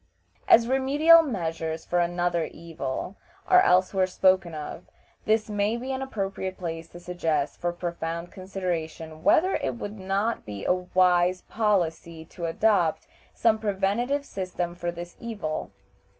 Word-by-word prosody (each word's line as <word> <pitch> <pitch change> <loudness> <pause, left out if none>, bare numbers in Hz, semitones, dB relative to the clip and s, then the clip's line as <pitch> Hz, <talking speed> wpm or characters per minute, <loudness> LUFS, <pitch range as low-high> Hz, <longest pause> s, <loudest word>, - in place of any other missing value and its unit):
As 230 0 +6
remedial 285 +6 +6
measures 165 - -3
for 175 - +1
another 175 -1 0
evil 165 +2 -6 0.3
are 365 0 +6
elsewhere 185 - +3
spoken 185 -2 +2
of, 155 +3 -7 0.4
this 215 0 +2
may 210 +2 0
be 255 +3 -5
an 265 0 -3
appropriate 195 -6 -4
place 165 -2 -5
to 175 - -11
suggest 165 -5 -2
for 175 0 0
profound 170 -1 -4
consideration 165 -4 -5
whether 370 +4 +4
it 130 -2 -3
would 205 - -7
not 195 +4 -1
be 100 -2 -7
a - - +4
wise 180 0 +2
policy 170 -6 -1
to 170 0 -6
adopt 175 -2 +2 0.3
some 225 -1 +3
preventive 215 +7 0
system 180 -4 -4
for 175 0 -3
this 175 0 -8
evil. 205 -10 -4
180 Hz, 135 wpm, -26 LUFS, 170-210 Hz, 0.4 s, As